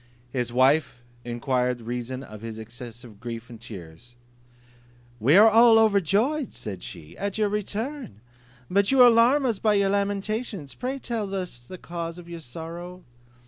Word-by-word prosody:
His 125 -3 -2
wife 130 0 +2 0.2
enquire 125 +1 0
reason 120 +2 -5
of 110 -5 -11
his 115 -1 -6
excessive 115 -1 -10
grief 115 0 -7
and 115 -1 -11
tears; 105 +2 -11 1.0
"We 135 - +5
are 215 +2 +9
all 225 +1 +7
overjoyed," 220 - +2
said 95 -4 -7
she, 80 -3 -10
"at 200 0 -2
your 210 -1 +2
return; 210 - -4 0.5
but 200 +5 +2
you 265 -2 +7
alarm 245 +4 +5
us 225 -6 0
by 215 -2 +3
your 200 -1 +3
lamentations; 200 - -2
pray 255 - -3
tell 220 -6 -3
us 180 -10 -4
the 120 +10 -11
cause 170 -1 -6
of 175 -1 -11
your 170 -1 -7
sorrow." 170 +6 -8
170 Hz, 150 wpm, -25 LUFS, -, 1.0 s, are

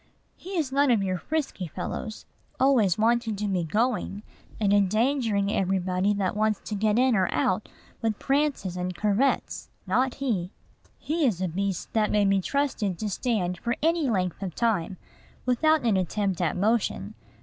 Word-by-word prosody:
He 380 0 -6
is 295 -5 0
none 280 +1 +3
of 225 -5 +3
your 185 -2 -1
frisky 290 - -3
fellows, 185 +7 -6 0.3
always 245 -9 +4
wanting 230 0 +2
to 210 +1 -2
be 185 -3 0
going, 210 +3 -1 0.4
and 205 -2 +2
endangering 215 0 +2
everybody 190 0 +1
that 200 -1 -1
wants 215 -1 +1
to - - -6
get 210 +1 +1
in 255 -1 +4
or 185 -3 +1
out 185 +8 0 0.3
with 220 -2 0
prances 275 -10 0
and 180 0 -3
curvets, 210 +8 0 0.2
not 255 +1 +1
he! 215 -11 -1 0.5
He 320 +2 -1
is 200 -8 0
a 185 - 0
beast 195 +1 -3
that 215 -2 +2
may 210 -1 +3
be 195 -1 +3
trusted 240 -7 -1
to 210 +1 -3
stand 185 -6 -1
for 235 0 -1
any 325 -3 +2
length 185 -4 -1
of 185 -4 -4
time 200 -6 0 0.5
without 310 +5 +3
an 220 -5 +2
attempt 190 +1 -1
at 175 +1 0
motion. 220 +4 0
210 Hz, 165 wpm, -26 LUFS, 190-245 Hz, 0.5 s, always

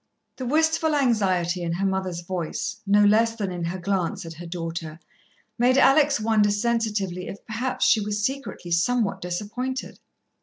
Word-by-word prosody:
The 255 - -4
wistful 320 +2 +2
anxiety 190 -9 +1
in 170 -1 -2
her 190 +3 -1
mother's 190 -3 -1
voice, 175 +2 -4
no 205 +1 +5
less 225 +2 +4
than 200 -4 -3
in 175 -1 -4
her 175 +3 -3
glance 185 -2 -2
at 165 - -7
her 170 +2 -9
daughter, 165 -2 -5 0.6
made 250 +2 +4
Alex 280 0 +5
wonder 215 -1 +3
sensitively 205 -4 -1
if, 200 - -9
perhaps, 235 +4 -1
she 215 - +4
were 210 - -4
secretly 210 -3 -3
somewhat 195 +2 +1
disappointed. 215 +9 -4
205 Hz, 155 wpm, -24 LUFS, 175-235 Hz, 0.6 s, no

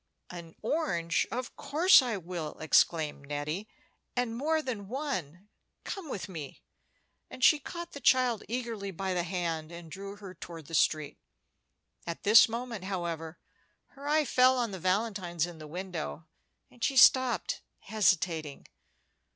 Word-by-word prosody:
"An 170 -2 -9
orange! 185 - 0
of 250 +1 -4
course 305 +5 +5
I 240 -5 -2
will," 170 -3 -6
exclaimed 155 -2 +2
Nettie; 150 +8 -3 0.5
"and 245 -2 -1
more 310 +5 0
than 220 -7 -4
one. 200 - -4 0.4
Come 385 -7 -6
with 200 - -4
me;" 160 -7 -8 0.7
and 255 - -8
she 305 - +7
caught 340 +4 -7
the 285 - -8
child 250 -3 +3
eagerly 230 -4 -3
by 190 +1 -3
the 180 - +1
hand, 170 -3 -3
and 170 -1 -10
drew 200 +2 -7
her 200 -3 -10
toward 165 -3 -10
the 165 - -12
street. 155 -2 +1 0.9
At 170 - -5
this 215 +2 +8
moment, 230 -4 -5
however, 170 -4 -4 0.5
her 280 +1 -10
eye 305 +1 +3
fell 255 +1 +4
on 235 -3 0
the 190 - -6
valentines 185 -3 0
in 175 -2 -10
the 155 - -9
window, 175 - -5 0.5
and 235 - -11
she 270 +5 +1
stopped, 260 - +5 0.2
hesitating. 170 -8 0
195 Hz, 145 wpm, -30 LUFS, 170-250 Hz, 0.9 s, this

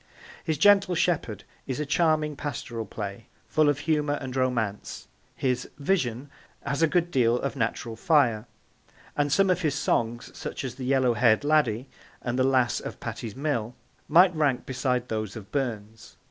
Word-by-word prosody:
His 160 -2 -1
Gentle 195 +2 +5
Shepherd 145 - 0 0.2
is 130 +1 -3
a 150 - -1
charming 155 0 +1
pastoral 120 -6 -5
play, 100 +1 -6 0.2
full 155 -1 +3
of 145 - +1
humour 150 -2 +1
and 130 -3 -6
romance; 120 -6 -2 0.3
his 125 -1 -1
Vision 140 -5 -1 0.3
has 140 +1 -1
a 165 - +5
good 175 +1 0
deal 120 -5 +3
of 140 -2 -3
natural 115 0 -2
fire; 120 -5 +2 0.7
and 145 -1 0
some 195 +4 +4
of 180 0 0
his 150 -4 0
songs, 120 -4 -1
such - - -5
as 130 -3 -4
The 130 0 -7
Yellow 130 -2 +3
hair'd 115 +1 +3
Laddie 140 -5 +2 0.3
and 125 +1 -3
The - - +4
Lass 130 -2 +2
of - - -8
Patie's 110 -3 -6
Mill, 130 -5 -2 0.3
might 180 +3 +6
rank 145 -5 +1
beside 125 -1 -1
those 110 -3 -3
of 105 -3 -10
Burns. 110 -5 -4
130 Hz, 165 wpm, -26 LUFS, 115-150 Hz, 0.7 s, might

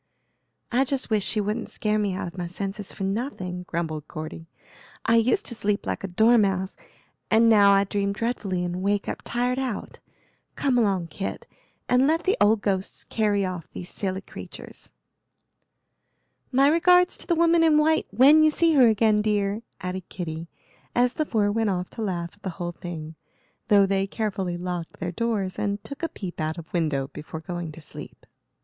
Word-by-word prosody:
"I 250 +3 +3
just 275 -3 -1
wish 210 -2 +2
she 215 - +1
wouldn't 210 +3 -2
scare 215 0 -1
me 200 -3 0
out 185 - -3
of 170 - -9
my 175 -2 -4
senses 195 +3 -5
for - - -6
nothing," 195 -4 -3
grumbled 160 -3 -3
Cordy; 155 +1 -7 0.6
"I 230 - +4
used 230 +2 +2
to - - +2
sleep 205 -2 -1
like 215 - -3
a - - -2
dormouse, 195 -1 +3 0.5
and 225 +1 +5
now 205 -3 +7
I 195 0 +5
dream 200 0 -1
dreadfully 200 -4 -2
and 175 +1 -3
wake 200 +1 0
up - - -4
tired 250 +2 -1
out. 255 -6 -4 0.6
Come 260 -3 +2
along, 190 -6 +1
Kit, 195 +5 -5 0.4
and 250 +2 +4
let 325 +2 +2
the 380 - +2
old 210 +1 +4
ghosts 195 -2 -1
carry 205 -3 +1
off 180 -3 -5
these 180 - -8
silly 190 -1 -3
creatures." - - -10 1.6
"My 270 +2 +5
regards 360 +3 +5
to - - -9
the 340 - +2
Woman 335 0 +4
in 315 -2 +5
White 315 +1 +3
when 270 +9 +6
you 310 - +6
see 330 +2 +2
her 260 -5 +7
again, 215 -1 +3
dear," 210 0 0 0.2
added 185 0 -5
Kitty, 165 -2 -5 0.5
as 245 +1 +3
the 310 - -1
four 205 -3 +1
went 220 0 +1
off 180 -1 -2
to 230 - -7
laugh 175 -5 -2
at 205 - -24
the 190 - -4
whole 175 -2 -3
thing, 165 -2 -7 0.5
though 205 -4 +6
they 195 0 0
carefully 195 -5 -2
locked 175 -1 -5
their 175 +1 -3
doors 200 -2 -2
and 205 0 -2
took 275 +6 -9
a 330 - -1
peep 180 -5 -6
out 155 +2 -2
of 165 -1 -10
window 150 -6 0
before 155 +1 -7
going 175 -1 -5
to 160 - -11
sleep. - - -10
200 Hz, 185 wpm, -25 LUFS, 180-235 Hz, 1.6 s, now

